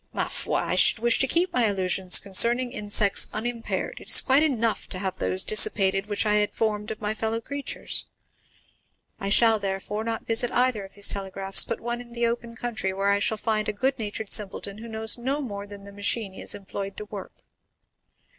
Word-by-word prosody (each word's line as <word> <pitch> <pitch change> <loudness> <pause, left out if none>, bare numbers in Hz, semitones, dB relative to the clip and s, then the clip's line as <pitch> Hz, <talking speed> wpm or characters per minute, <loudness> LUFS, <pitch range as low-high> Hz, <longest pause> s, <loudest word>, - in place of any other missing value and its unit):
Ma - - -1
foi! - - -2
I - - -2
should - - +4
wish 235 +1 +2
to 270 - +3
keep 350 +5 +1
my 245 -3 +3
illusions 185 -1 +2
concerning 235 +6 +3
insects 205 -4 +2
unimpaired; 235 - -4
it - - -5
is - - +9
quite 270 +2 +4
enough 235 -8 0
to 185 - -4
have 190 0 -4
those 95 0 -1
dissipated 195 -2 +4
which 205 +1 0
I 210 0 +3
had 210 0 0
formed 210 -2 -2
of 220 - -7
my 210 0 -2
fellow 220 +1 -2
creatures. 280 +4 -4 1.1
I 195 - -3
shall, 225 +1 +4
therefore, 200 +2 -4
not 225 0 -4
visit 235 +2 +1
either 245 -4 +1
of 195 - -13
these 205 -1 0
telegraphs, 195 0 0
but - - -4
one 240 +1 -4
in 240 -1 -12
the 235 0 -1
open 235 0 -3
country 235 -6 -3
where 195 +1 0
I 200 - +2
shall 220 +1 +1
find 215 -1 -1
a - - -2
good 260 +6 -1
natured 215 -1 -5
simpleton, 200 0 -1
who 230 - -9
knows 220 +1 -1
no 270 +4 -2
more 205 -7 -6
than 200 -1 -11
the 200 - -11
machine 205 0 0
he - - -9
is - - -1
employed 195 0 -7
to 210 - -7
work." 205 -2 -9
215 Hz, 205 wpm, -25 LUFS, 200-235 Hz, 1.1 s, is